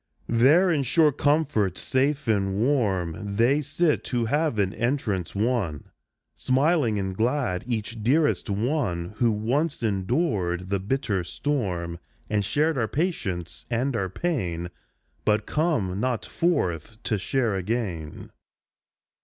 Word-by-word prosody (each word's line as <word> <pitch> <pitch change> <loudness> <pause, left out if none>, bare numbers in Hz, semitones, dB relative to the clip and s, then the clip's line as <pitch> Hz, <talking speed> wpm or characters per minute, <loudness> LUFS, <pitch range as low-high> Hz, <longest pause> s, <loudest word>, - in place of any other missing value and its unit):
There 145 +11 +5
in 150 -4 +2
sure 150 +4 +4
comfort, 145 - +1
safe 140 +1 0
and 100 -3 +1
warm; 100 - 0
They 125 +7 +3
sit 155 +2 0
who 120 -2 0
have 145 0 0
an 100 -1 +1
entrance 110 - -1
won, 100 - -1 0.4
Smiling 135 -3 +2
and 95 -1 -2
glad; 120 -4 0
each 115 -1 -3
dearest 145 +3 +2
one 105 - -1
Who 120 0 +3
once 125 +8 -1
endured 95 - 0
the 100 - +1
bitter 105 -2 -1
storm, 90 - -2 0.3
And 105 -1 +2
shared 150 +7 +1
our 110 - +1
patience 105 - -3
and 125 +2 0
our 95 -4 -1
pain, 90 - -2 0.5
But 105 0 +2
come 125 - 0
not 125 -1 -1
forth 110 - -1
to 105 -4 0
share 115 +2 0
again. 95 -6 -3
115 Hz, 125 wpm, -25 LUFS, 95-140 Hz, 0.5 s, There